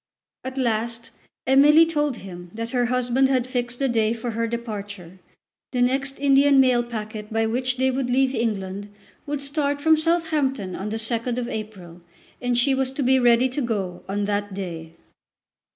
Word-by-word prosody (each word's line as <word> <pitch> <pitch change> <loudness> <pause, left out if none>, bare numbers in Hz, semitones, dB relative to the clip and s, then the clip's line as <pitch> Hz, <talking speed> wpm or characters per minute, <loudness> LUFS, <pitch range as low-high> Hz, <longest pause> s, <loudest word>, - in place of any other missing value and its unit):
At 260 +1 -6
last 235 -1 -1 0.3
Emily 290 +5 +6
told 295 -5 -1
him 175 -3 -10
that 230 +1 -4
her 245 -2 +1
husband 250 +2 +2
had 255 -3 +1
fixed 245 -1 -3
the 275 - +1
day 225 -2 +1
for 235 +1 -4
her 230 +1 -1
departure. 205 -6 -6 0.5
The 245 -1 +2
next 270 +2 -1
Indian 275 0 +5
mail 255 -2 +4
packet 215 -2 -6
by 225 0 +1
which 250 +3 -1
they 260 +1 +2
would 260 -1 -2
leave 260 +1 +2
England 205 -4 -3 0.4
would 290 -1 -3
start 285 0 -1
from 315 +2 +4
Southampton 310 - 0
on 200 +2 -4
the 220 - -3
2nd 230 +2 -1
of 245 -1 -2
April, 195 -7 -7 0.4
and 245 -1 0
she 270 +3 +3
was 265 -1 0
to 275 - -2
be 260 +1 +4
ready 240 +1 +4
to 265 +3 -3
go 195 -7 -3
on 205 +1 -1
that 205 -1 -2
day. 165 -4 -6
240 Hz, 175 wpm, -23 LUFS, 215-265 Hz, 0.5 s, Emily